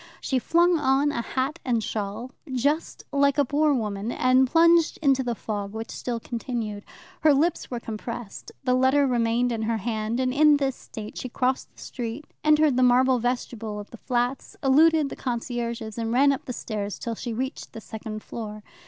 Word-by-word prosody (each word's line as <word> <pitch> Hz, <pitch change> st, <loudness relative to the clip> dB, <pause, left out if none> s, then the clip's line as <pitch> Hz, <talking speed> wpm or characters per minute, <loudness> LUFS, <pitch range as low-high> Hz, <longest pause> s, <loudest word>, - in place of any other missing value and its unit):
She 265 Hz, -2 st, 0 dB
flung 340 Hz, +5 st, +3 dB
on 280 Hz, +1 st, +2 dB
a 235 Hz, -, -2 dB
hat 265 Hz, +6 st, -2 dB
and 235 Hz, -4 st, 0 dB
shawl, 215 Hz, +4 st, -4 dB, 0.2 s
just 285 Hz, +6 st, -1 dB
like 280 Hz, 0 st, +3 dB
a 285 Hz, -, +4 dB
poor 295 Hz, +3 st, +2 dB
woman, 215 Hz, -4 st, -1 dB
and 255 Hz, +1 st, +3 dB
plunged 335 Hz, +1 st, +4 dB
into 275 Hz, -4 st, +3 dB
the 240 Hz, -2 st, -2 dB
fog, 205 Hz, -2 st, -4 dB
which 225 Hz, +1 st, -6 dB
still 240 Hz, -2 st, -3 dB
continued. 230 Hz, -3 st, -4 dB, 0.4 s
Her 305 Hz, -2 st, +5 dB
lips 330 Hz, +5 st, +1 dB
were 245 Hz, -, -3 dB
compressed, 230 Hz, -1 st, -7 dB
the 255 Hz, -1 st, +2 dB
letter 260 Hz, +3 st, +4 dB
remained 240 Hz, -1 st, +1 dB
in 225 Hz, -2 st, -2 dB
her 225 Hz, +1 st, 0 dB
hand, 220 Hz, +2 st, -2 dB
and 255 Hz, -1 st, +1 dB
in 300 Hz, +1 st, +6 dB
this 270 Hz, -2 st, -1 dB
state 215 Hz, -1 st, -8 dB
she 255 Hz, -, -5 dB
crossed 255 Hz, +2 st, -1 dB
the -, -, -14 dB
street, 245 Hz, +4 st, -5 dB, 0.2 s
entered 305 Hz, -3 st, +4 dB
the -, -, +3 dB
marble 255 Hz, +1 st, +4 dB
vestibule 230 Hz, -3 st, -3 dB
of 205 Hz, -, -10 dB
the 235 Hz, -, -10 dB
flats, 245 Hz, +2 st, -2 dB
eluded 305 Hz, +2 st, +5 dB
the -, -, -6 dB
concierges, 235 Hz, -3 st, -4 dB
and 225 Hz, 0 st, -2 dB
ran 275 Hz, +4 st, +5 dB
up 275 Hz, -, -3 dB
the -, -, -4 dB
stairs 210 Hz, -3 st, -4 dB
till 235 Hz, -, -4 dB
she 235 Hz, +2 st, -5 dB
reached 260 Hz, +4 st, -4 dB
the -, -, -7 dB
second 220 Hz, -1 st, -7 dB
floor. 215 Hz, -2 st, -7 dB
245 Hz, 190 wpm, -25 LUFS, 225-275 Hz, 0.4 s, in